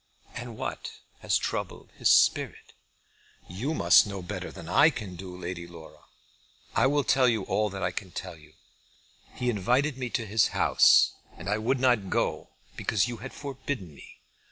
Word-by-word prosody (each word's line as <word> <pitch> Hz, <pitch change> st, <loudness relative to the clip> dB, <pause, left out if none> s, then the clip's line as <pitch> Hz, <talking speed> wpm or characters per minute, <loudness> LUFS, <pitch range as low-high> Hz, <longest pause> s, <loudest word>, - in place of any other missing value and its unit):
"And 120 Hz, -2 st, -7 dB
what -, -, -5 dB, 0.3 s
has -, -, +1 dB
troubled -, -, -4 dB
his -, -, +1 dB
spirit?" -, -, +2 dB, 0.7 s
"You 120 Hz, -, -3 dB
must 85 Hz, -, +6 dB
know 100 Hz, -2 st, -5 dB
that 90 Hz, -, -12 dB
better -, -, -5 dB
than 85 Hz, -, -10 dB
I 90 Hz, -, +5 dB
can 105 Hz, -, -7 dB
do, 90 Hz, 0 st, -9 dB
Lady 85 Hz, -1 st, -6 dB
Laura. 85 Hz, -2 st, -14 dB, 0.7 s
I -, -, +3 dB
will 145 Hz, +1 st, +1 dB
tell 130 Hz, -1 st, +3 dB
you 110 Hz, -4 st, 0 dB
all 105 Hz, +2 st, 0 dB
that 95 Hz, -1 st, -6 dB
I 90 Hz, -, 0 dB
can 95 Hz, -, -6 dB
tell 90 Hz, 0 st, -7 dB
you. 75 Hz, -1 st, -19 dB, 0.8 s
He 125 Hz, -, -3 dB
invited 125 Hz, +6 st, +1 dB
me 125 Hz, -2 st, -3 dB
to 115 Hz, -1 st, -2 dB
his 105 Hz, 0 st, +2 dB
house -, -, +5 dB, 0.2 s
and 90 Hz, -, -10 dB
I 105 Hz, +2 st, 0 dB
would 125 Hz, +4 st, 0 dB
not 120 Hz, -7 st, +2 dB
go, -, -, -1 dB, 0.3 s
because 110 Hz, +1 st, 0 dB
you 120 Hz, -1 st, -5 dB
had 130 Hz, +5 st, -8 dB
forbidden 135 Hz, -, -6 dB
me. -, -, -15 dB
105 Hz, 180 wpm, -27 LUFS, 90-125 Hz, 0.8 s, must